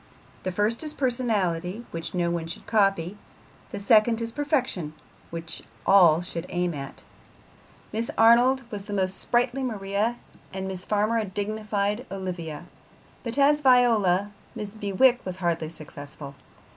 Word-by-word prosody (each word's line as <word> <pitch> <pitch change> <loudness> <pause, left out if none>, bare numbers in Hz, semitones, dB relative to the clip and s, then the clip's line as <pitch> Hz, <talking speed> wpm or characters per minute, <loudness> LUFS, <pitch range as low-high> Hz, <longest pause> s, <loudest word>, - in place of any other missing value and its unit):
The 185 - -2
first 210 +5 0
is 305 -1 -4
personality, 220 -6 0
which 165 +2 -5
no 170 -1 +1
one 170 -1 -2
should 170 - -8
copy; 195 -3 +1 0.5
the - - -5
second 220 +3 +4
is 230 0 -3
perfection, 260 - -1 0.4
which 165 0 -6 0.2
all 175 -5 +6
should 170 -1 -5
aim 175 -1 -1
at. 140 -2 -8 0.9
Miss 225 +2 -2
Arnold 245 +4 +5
was 205 -1 -6
a - - -3
most 190 -1 -1
sprightly 245 +2 +1
Maria, 215 -1 -1 0.3
and 190 0 -4
Miss 190 -1 -5
Farmer 215 +2 +1
a 220 - -1
dignified 210 +3 -2
Olivia; 175 -5 -5 0.6
but 235 +2 -4
as 295 +1 +4
Viola 220 -7 +4 0.3
Mrs. 210 0 -6
Bewicke 240 +5 +3
was 185 -1 -4
hardly 170 -3 -1
successful. 145 -2 -10
200 Hz, 140 wpm, -26 LUFS, 175-230 Hz, 0.9 s, all